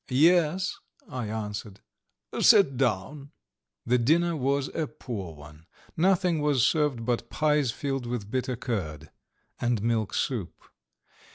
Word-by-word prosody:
"Yes," 170 +6 +3 0.3
I 125 -4 -4
answered. 105 -1 -5 0.6
"Sit 195 -11 +6
down." 135 +3 -1 0.6
The 125 +1 +3
dinner 165 +7 +2
was 140 0 0
a 160 -2 -2
poor 105 - -7
one. 75 +2 -14 0.3
Nothing 180 -2 +2
was 145 -5 +3
served 145 -7 +1
but 120 -1 -1
pies 150 -3 +1
filled 135 +1 -3
with 115 -4 -4
bitter 130 0 -1
curd, 80 - -4 0.5
and 120 -3 0
milk 115 -3 0
soup. 110 - -2
125 Hz, 120 wpm, -27 LUFS, 110-150 Hz, 0.6 s, Sit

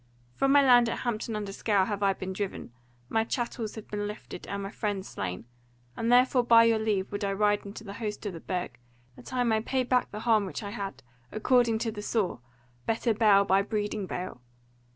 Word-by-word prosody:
From 275 - +2
my 285 0 +6
land 245 -3 +6
at - - -3
Hampton 230 -2 -2
under 205 -2 -4
Scaur 200 -1 +1
have 205 -1 -3
I 195 -1 +3
been 190 0 -5
driven, 190 - -5 0.3
my 225 - +1
chattels 235 -2 -3
have 220 - -9
been 205 0 -3
lifted, 210 -3 -8
and 200 0 -4
my 195 - -5
friends 205 -3 -3
slain; 90 +4 -5 0.5
and 230 +1 0
therefore 250 0 +5
by 230 -1 +7
your 230 -1 +3
leave 205 -3 -1
would 205 +1 -3
I 200 - 0
ride 205 +1 +2
in 200 - -8
the 210 -2 -8
host 210 0 -5
of 200 - -3
the 165 - -7
Burg, 180 -9 -4 0.4
that - - -12
I 250 -1 +1
may 220 -2 +2
pay 260 +3 0
back 250 0 +1
the 210 - -7
harm 220 -4 +3
which 190 - -6
I 200 - -5
had, 195 - -6 0.3
according 235 0 +3
to 225 - -1
the 210 -1 -7
saw, 205 - -1 0.5
'better 225 +1 +1
bale 205 -2 +5
by 195 0 +4
breeding 205 -1 -2
bale.' 180 -9 -5
210 Hz, 215 wpm, -28 LUFS, 200-230 Hz, 0.5 s, by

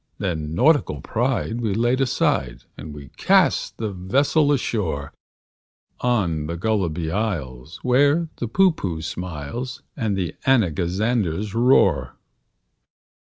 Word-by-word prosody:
Then 80 -5 -3
nautical 145 - +3
pride 120 - -1
we 105 -4 -1
laid 120 +4 +1
aside, 65 - 0
And 80 - -9
we 70 -2 -10
cast - - +2
the 110 -2 -3
vessel 140 - +1
ashore 95 - -2 0.9
On 90 -11 0
the 85 +1 -4
Gulliby 85 -5 -1
Isles, 80 - -4
where 145 +6 +3
the 120 - -3
Poohpooh 110 - +1
smiles, 90 - -5
And 110 -7 -1
the 90 -3 -2
Anagazanders 100 - +1
roar. 95 - +3
100 Hz, 110 wpm, -22 LUFS, 80-120 Hz, 0.9 s, nautical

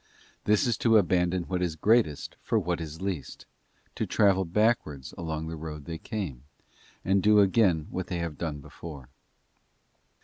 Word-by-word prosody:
This 105 +4 +3
is 120 - +1
to 115 -2 +5
abandon 90 -1 +2
what.is 90 -2 -2
greatest 105 -4 +2
for 115 - 0
what 90 -4 -1
is 80 +3 -7
least, 95 -8 -4 0.5
to - - -2
travel 95 -2 +3
backwards 85 - 0
along 80 -1 -4
the 80 +1 -5
road 75 -2 -7
they 80 -1 -6
came, 90 - -5 0.6
and 95 +1 +3
do 105 +2 +5
again 95 -5 +3
what 95 -1 -3
they 90 - -3
have 85 -3 -4
done 75 -4 -3
before. 70 -3 -10
90 Hz, 150 wpm, -28 LUFS, 80-100 Hz, 0.6 s, to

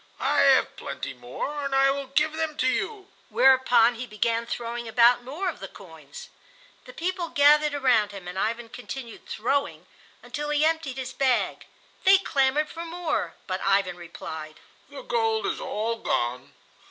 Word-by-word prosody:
I - - +1
have - - +4
plenty - - -6
more, 130 - -5
and 275 -1 -1
I 270 0 +5
will 275 0 -4
give 300 +3 +1
them 315 -1 -3
to - - 0
you;" 395 +7 -2 0.2
whereupon 260 -3 +5
he 240 +2 -7
began 230 +2 -1
throwing 235 0 -4
about 240 +2 +4
more 300 +10 -4
of - - -3
the - - -7
coins. 485 0 -12 0.6
The - - -11
people 355 -1 -2
gathered 295 0 +4
around 245 -7 +2
him, 195 -3 -9
and 180 - -7
Ivan 230 +4 -2
continued 245 0 -9
throwing 275 +6 -2 0.4
until 295 -1 -5
he 295 +1 +2
emptied 320 -5 -1
his 260 -1 -5
bag. 260 -3 0 0.4
They 385 +1 +7
clamored 290 -4 +1
for 335 - -7
more, 340 0 -3
but 185 0 -3
Ivan 195 -2 +2
replied: 160 -3 -8 0.3
"The - - -9
gold 450 -3 0
is - - -2
all 230 - -2
gone. 120 - -2
265 Hz, 165 wpm, -26 LUFS, 230-315 Hz, 0.6 s, They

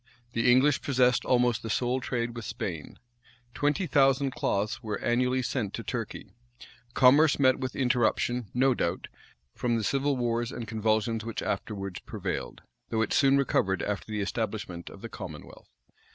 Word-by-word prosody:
The 115 +1 +3
English 130 +3 +4
possessed 125 -2 +2
almost 120 -2 +2
the 115 - -6
sole 125 +4 0
trade 120 -1 -2
with 120 - -6
Spain. 105 - -5 0.6
Twenty 150 +6 0
thousand 135 -3 +3
cloths 105 0 -1
were 110 -2 -3
annually 125 +2 +1
sent 115 -5 -2
to 115 - -6
Turkey.[] 115 +2 -5 0.6
Commerce 145 +4 +6
met 130 -2 +4
with 130 -1 -4
interruption, 120 -2 +1
no 130 +1 +3
doubt, 85 -6 -2 0.4
from 120 -1 0
the 110 - -2
civil 140 +4 +1
wars 120 -1 -1
and 115 -2 -6
convulsions 110 0 0
which 115 0 -4
afterwards 100 -4 -4
prevailed; - - -5 0.3
though 110 0 +1
it 105 - -2
soon 140 -1 +4
recovered 95 -8 +1
after 105 +1 -3
the 105 -1 -1
establishment 100 -4 -4
of - - -13
the - - -4
commonwealth. - - -10
120 Hz, 155 wpm, -28 LUFS, 110-130 Hz, 0.6 s, Commerce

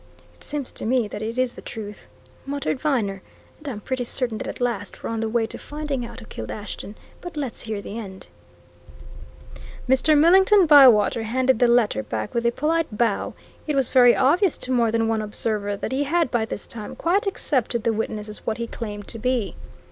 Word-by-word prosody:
"It - - -19
seems 290 -3 -4
to - - -8
me 245 -2 +2
that 205 - -6
it 225 +2 -4
is 255 -1 +1
the - - -11
truth!" 210 -2 -8 0.4
muttered 280 -1 -2
Viner. 220 -11 0 0.4
"And 300 - -11
I'm 240 -7 -4
pretty 255 +4 -3
certain 240 -2 -2
that - - -5
at - - -6
last 235 -5 -3
we're - - -3
on 225 - -2
the 225 0 -1
way 230 0 +1
to - - -8
finding 295 -4 -4
out 255 - -11
who - - -11
killed 110 - -7
Ashton. 210 0 -7 0.3
But 350 -3 -8
let's 270 -5 -4
hear 215 -3 -5
the 220 - -6
end." 190 -4 -9 1.6
Mr. 265 +4 +4
Millington 380 +5 +6
Bywater 255 -8 +7
handed 255 +2 +1
the 245 - +5
letter 235 - +3
back 110 0 -4
with 235 0 +1
a - - +3
polite 305 -3 -1
bow 230 -3 0 0.3
it 300 - 0
was 270 -3 +1
very 245 -2 +6
obvious 335 +7 +3
to 255 - -4
more 235 -3 +3
than 225 0 +1
one 225 -1 0
observer 210 -1 -2
that - - -4
he 275 +2 0
had 330 -1 +1
by 230 -2 +1
this 210 - -6
time 215 -3 -7
quite 390 +5 +1
accepted 255 - -1
the 230 -1 +2
witness 215 -1 -3
as 210 - -9
what 220 - -2
he 235 - -3
claimed 210 -3 -7
to 230 - -5
be. 235 -6 -1
235 Hz, 210 wpm, -23 LUFS, 215-275 Hz, 1.6 s, Bywater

